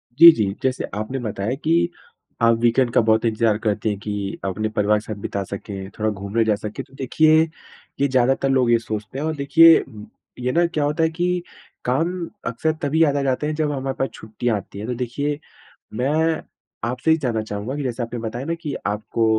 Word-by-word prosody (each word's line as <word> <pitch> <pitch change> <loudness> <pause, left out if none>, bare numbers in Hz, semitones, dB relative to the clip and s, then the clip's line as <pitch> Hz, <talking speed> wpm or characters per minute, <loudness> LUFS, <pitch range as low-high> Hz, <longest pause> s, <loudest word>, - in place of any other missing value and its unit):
जी, 170 +3 +11
जी। 100 -7 -1
जैसे 130 -1 0
आपने 110 +6 -3
बताया 110 0 -2
कि 170 +2 +3 0.5
आप 115 0 +5
वीकेंड 120 +1 +3
का - - +5
बहुत 110 0 +2
इंतज़ार 110 -1 +2
करते 105 0 -1
हैं 105 - -2
कि 100 -1 -4
अपने 110 +3 -1
परिवार 105 0 +2
के - - -11
साथ 110 0 -6
बिता 100 -1 -3
सकें, 95 -1 -7
थोड़ा 110 0 +1
घूमने 100 +3 -1
जा 110 -1 +3
सकें। 105 +1 -6
तो 135 - -24
देखिए, 155 +4 +4 0.6
ये 140 - +4
ज़्यादातर 130 +1 +2
लोग 130 -3 +3
ये 115 - +6
सोचते 110 0 -5
हैं। 150 - -2
और 160 0 -1
देखिए, 160 +4 +6 0.6
ये 125 0 0
ना 170 +5 +3
क्या 155 -3 -1
होता 150 +3 +1
है 160 - +3
कि 175 +1 -1 0.4
काम 165 +7 0 0.2
अक्सर 125 +7 0
तभी 155 +3 +3
याद 145 -3 +2
आ 140 - +1
जाते 135 +2 0
हैं 155 - -2
जब 150 -1 0
हमारे 135 -1 -3
पास 135 - 0
छुट्टियाँ 110 +2 -2
आती 100 - -10
हैं। 110 - -5
तो 125 - -1
देखिए, 140 +5 -2 0.5
मैं 155 +7 +1 0.5
आपसे 125 +6 0
ये 160 - +5
जानना 120 -7 -1
चाहूँगा 105 +4 -5
कि 145 - -3
जैसे 125 -2 -2
आपने 120 +1 -5
बताया 115 +3 -4
ना 165 - -1
कि 150 -4 -4
आपको 105 +2 -1
125 Hz, 205 wpm, -22 LUFS, 110-150 Hz, 0.6 s, जी